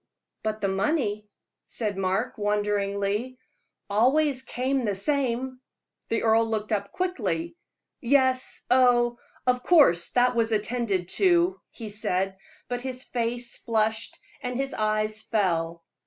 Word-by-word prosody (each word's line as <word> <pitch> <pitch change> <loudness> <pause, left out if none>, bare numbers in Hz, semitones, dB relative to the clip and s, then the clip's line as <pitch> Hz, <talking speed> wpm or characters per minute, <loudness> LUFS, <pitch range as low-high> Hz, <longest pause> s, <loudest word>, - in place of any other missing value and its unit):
"But 215 -1 -3
the 200 - +1
money," 210 +1 -1 0.4
said 210 -4 -2
Mark, 195 +4 -1
wonderingly, 205 +3 -1 0.5
"always 260 +6 +2
came 260 +1 -1
the 205 -3 0
same." 260 +1 -1 0.5
The 225 - 0
earl 225 0 +3
looked 215 -1 -2
up 200 -2 -1
quickly. 360 -2 -2 0.4
"Yes 260 0 +2
oh 240 -2 +4 0.3
of 250 0 +2
course 265 - +5
that 250 0 +4
was 230 -1 +1
attended 210 -4 0
to," 365 0 +3
he 225 -3 -8
said; 195 -2 -1 0.3
but 245 0 -3
his 255 0 -4
face 240 0 -3
flushed 220 0 -1 0.2
and 250 -1 -3
his 275 0 -2
eyes 215 0 0
fell. 170 -7 -1
230 Hz, 125 wpm, -26 LUFS, 205-255 Hz, 0.5 s, course